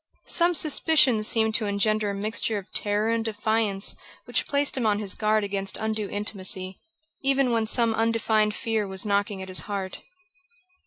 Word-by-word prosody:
Some 345 0 +2
suspicion 300 -6 +4
seemed 220 +1 +2
to 215 -1 0
engender 210 +1 +1
a 200 - -3
mixture 215 +1 -2
of 195 - -9
terror 210 +2 0
and 230 0 0
defiance 215 -2 -1 0.3
which - - -1
placed 285 0 +1
him 255 - -1
on 205 -1 +2
his 205 -3 -1
guard 215 0 +1
against 195 -1 -2
undue 220 -2 -3
intimacy, 190 -2 -2 0.4
even 275 -2 +1
when 225 -1 0
some 230 0 +2
undefined 220 -1 +1
fear 225 -3 -1
was 190 +1 -1
knocking 200 -1 -1
at - - -9
his 185 0 +3
heart. 195 -2 -4
215 Hz, 165 wpm, -25 LUFS, 200-225 Hz, 0.4 s, suspicion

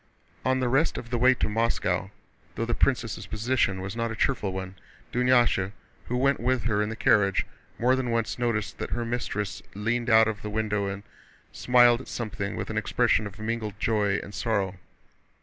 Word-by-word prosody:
On 130 0 +2
the 130 - 0
rest 135 +7 +2
of 120 - -8
the 120 - +1
way 130 +2 +5
to - - 0
Moscow, 105 -4 0 0.5
though 115 - -1
the 120 - -2
princess' 115 -5 0
position 110 -3 0
was 95 +3 -5
not 115 0 -1
a 115 - -4
cheerful 110 -4 0
one, 95 0 -5 0.4
Dunyásha, 120 -6 +3 0.3
who 125 - -1
went 135 +2 +2
with 130 -2 0
her 110 -2 +1
in 105 - -1
the 115 - -4
carriage, 100 -4 +3 0.3
more 125 +3 +3
than 130 -2 -2
once 115 0 -1
noticed 115 -4 -1
that - - -4
her 120 - -2
mistress 115 -4 -3
leaned 115 +3 -1
out 110 -1 +6
of 110 -1 -3
the 105 - -5
window 105 -1 -1
and 100 +1 -5 0.5
smiled 120 -1 +4
at - - -12
something 110 -4 -4
with - - -4
an - - 0
expression 105 - +1
of 100 +2 -11
mingled 110 -2 -4
joy 105 -3 +1
and 100 - -10
sorrow. 100 -6 -1
115 Hz, 190 wpm, -27 LUFS, 105-120 Hz, 0.5 s, out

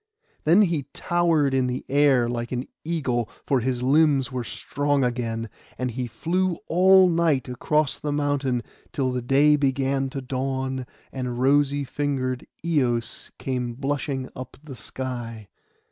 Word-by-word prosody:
Then 175 +7 +6
he 165 -7 -1
towered 165 -5 +2
in 130 -1 +2
the 125 +1 -3
air 140 -4 +4
like 120 0 -3
an 125 +1 -2 0.2
eagle, 135 -8 -1 0.2
for 135 - +2
his 125 0 -1
limbs 140 -1 +3
were 125 -1 -3
strong 145 +3 -1
again; 115 -2 -2 0.3
and 125 -1 -2
he 125 +1 -3
flew 175 +8 -1
all 190 +2 +6
night 165 -6 +2
across 150 +4 0
the 150 - -2
mountain 145 -4 0 0.3
till 130 -2 0
the 125 0 -2
day 140 +4 +4
began 135 -1 0
to 135 - -5
dawn, 130 0 -3 0.2
and 125 -2 -4
rosy 140 +2 +3
fingered 130 -2 -2 0.2
Eos 120 -8 0
came 125 -3 -3
blushing 135 0 -2
up 130 0 -8
the 145 -4 -9
sky. 120 -5 -6
135 Hz, 145 wpm, -25 LUFS, 125-145 Hz, 0.3 s, Then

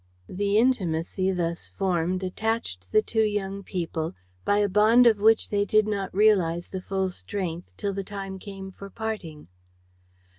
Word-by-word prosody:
The 200 +2 0
intimacy 190 -6 +1
thus 170 -2 -2
formed 185 -1 -1
attached 185 - -3
the 215 - +4
two 220 - 0
young 200 -2 -1
people 170 -4 -3 0.3
by 205 - +2
a 205 0 +3
bond 215 +5 +5
of 220 -3 +5
which 220 +2 +4
they 205 -1 +2
did 215 +1 +3
not 200 -2 -2
realize 185 -5 +3
the 190 - -5
full 190 0 -1
strength 175 -2 -5
till 200 -1 -2
the 195 0 -3
time 195 -1 -6
came 195 -1 -8
for 200 +1 -10
parting. 200 -8 -5
195 Hz, 155 wpm, -26 LUFS, 180-210 Hz, 0.3 s, bond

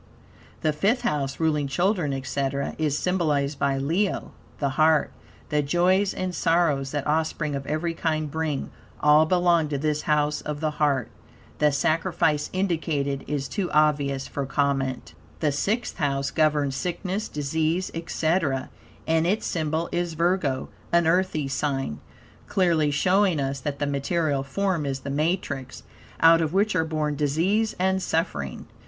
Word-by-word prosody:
The 155 - +1
Fifth 200 - +1
House, 140 -2 -1
ruling 150 -3 +1
children, 175 +2 +1
etc., 135 +1 -2
is 150 -2 +1
symbolized 150 -6 0
by 140 -1 +1
Leo 170 +9 -1 0.3
(the 140 - 0
Heart). 155 +3 +3 0.4
The 150 -1 +2
joys 180 +6 +2
and 185 -1 -3
sorrows 160 -5 +1
that 145 0 -3
offspring 155 0 0
of 140 0 -4
every 165 +2 -1
kind 155 -2 -1
bring, 160 -3 -2 0.3
all 150 +1 +5
belong 175 -2 +3
to 145 - -1
this 150 +1 0
House 150 -2 +1
of 150 -1 -4
the 155 0 0
Heart. 140 -4 +1 0.5
The 150 0 +4
sacrifice 155 +1 +1
indicated 160 -7 -1
is 140 -2 -2
too 190 +2 -2
obvious 145 -3 +2
for 140 -2 -4
comment. 135 -2 -1 0.3
The 150 -2 +1
Sixth 205 - -1
House 140 -3 0
governs 150 -3 +1
sickness, 180 +6 -3
disease, 160 +5 -1
etc., 165 -4 -1 0.3
and 160 +1 +2
its 205 +4 0
symbol 160 0 -1
is 175 -1 -2
Virgo, 165 -6 0 0.2
an 170 -1 +4
Earthy 165 -4 +1
sign, 135 - -2 0.5
clearly 170 -5 +2
showing 180 +3 +2
us 135 0 -2
that 140 +1 -4
the 145 - -1
material 145 +1 0
form 165 +2 -1
is 135 -1 -3
the 140 - -5
matrix, 145 -4 -2 0.4
out 165 0 +7
of 160 0 -1
which 205 +1 +2
are 160 -3 +2
born 155 -2 -1
disease 170 +10 +1
and 190 +1 +1
suffering. 160 - -2
155 Hz, 150 wpm, -25 LUFS, 140-170 Hz, 0.5 s, out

